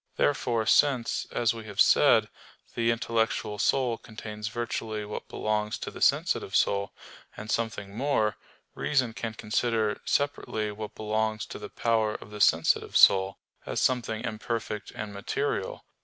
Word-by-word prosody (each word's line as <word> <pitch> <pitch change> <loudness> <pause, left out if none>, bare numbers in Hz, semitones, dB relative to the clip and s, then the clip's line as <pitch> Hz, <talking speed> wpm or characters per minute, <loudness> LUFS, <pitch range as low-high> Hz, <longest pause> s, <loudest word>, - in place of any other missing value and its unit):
Therefore 120 -5 +1
since, 130 0 +3
as 120 -1 +1
we 115 -1 -8
have 105 -2 -9
said, - - +6 0.5
the 115 0 +1
intellectual 115 -2 0
soul 125 -1 +1
contains 105 -1 -7
virtually 110 -2 -3
what 105 - -6
belongs 105 0 -1
to - - -6
the - - -11
sensitive - - +2
soul, 100 0 +2 0.5
and 110 +1 -6
something 105 -3 -2
more, 115 -4 +1 0.4
reason 130 -6 0
can 115 -1 -5
consider 110 0 0
separately 110 -7 -1
what 105 0 -7
belongs 110 0 -1
to - - -8
the - - -8
power 110 -2 +1
of 105 - -9
the 105 0 -6
sensitive 80 -3 +3
soul, 95 0 +6 0.3
as - - -1
something 115 -3 0
imperfect 110 -2 -4
and 105 -1 -6
material. 100 0 -3
110 Hz, 140 wpm, -28 LUFS, 105-115 Hz, 0.5 s, said